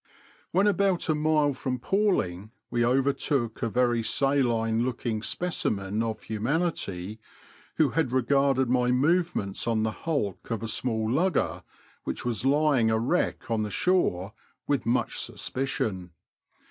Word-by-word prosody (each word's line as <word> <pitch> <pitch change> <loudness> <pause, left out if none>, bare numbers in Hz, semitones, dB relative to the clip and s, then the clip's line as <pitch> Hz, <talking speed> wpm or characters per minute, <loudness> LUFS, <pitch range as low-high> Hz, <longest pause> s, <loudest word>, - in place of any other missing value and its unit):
When 190 +4 +2
about 195 -3 +1
a - - +4
mile 150 -1 +2
from 130 -1 -3
Palling 120 - 0 0.2
we 120 0 +1
overtook 130 -1 0
a 115 - 0
very 120 0 +2
saline 120 -3 +1
looking 120 -3 -2
specimen 105 - -1
of 110 -1 -3
humanity, 110 - -2 0.6
who 155 -3 +3
had 160 -7 0
regarded 135 +1 +2
my 125 0 +2
movements 135 - +1
on 110 -2 +1
the 110 - 0
hulk 135 - -3
of 115 -1 -3
a - - -2
small 110 0 -1
lugger, 160 +9 +1 0.4
which - - -4
was 120 0 -1
lying 140 -4 +3
a 110 - +2
wreck 120 +1 -1
on 110 -1 +1
the 105 - -2
shore, 105 - +1 0.3
with 140 -6 -1
much 120 +2 0
suspicion. 110 -9 -2
125 Hz, 135 wpm, -27 LUFS, 110-145 Hz, 0.6 s, a